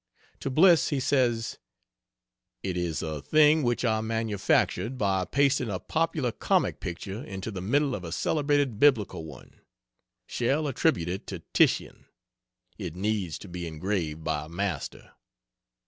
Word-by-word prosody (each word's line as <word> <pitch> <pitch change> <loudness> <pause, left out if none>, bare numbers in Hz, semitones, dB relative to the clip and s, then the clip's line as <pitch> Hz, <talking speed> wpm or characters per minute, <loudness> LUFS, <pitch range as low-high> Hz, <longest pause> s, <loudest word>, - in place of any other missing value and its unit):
To - - -3
Bliss 165 +4 +5
he 145 - 0
says: 120 -4 +1 1.0
"It 95 -2 -2
is 85 -3 -2
a 80 -3 -4
thing 155 - +5
which 120 -1 0
I 110 -2 +1
manufactured 110 +2 0
by 95 -4 +1
pasting 140 -1 +2
a 95 - -2
popular 155 - -1
comic - - 0
picture 95 +6 -6
into 95 +3 -6
the 95 -3 -5
middle 140 +8 +1
of 100 - -4
a 85 - -6
celebrated 145 - +1
Biblical 115 - +3
one 70 -5 -13 0.6
shall 140 +5 0
attribute 130 - +1
it 95 +2 -4
to - - -6
Titian. - - +2 0.7
It - - -5
needs 95 -4 -1
to - - -11
be 90 -1 -5
engraved 80 -1 -3
by 75 -1 -2
a - - -13
master." 90 -3 -4
110 Hz, 145 wpm, -27 LUFS, 90-135 Hz, 1.0 s, Bliss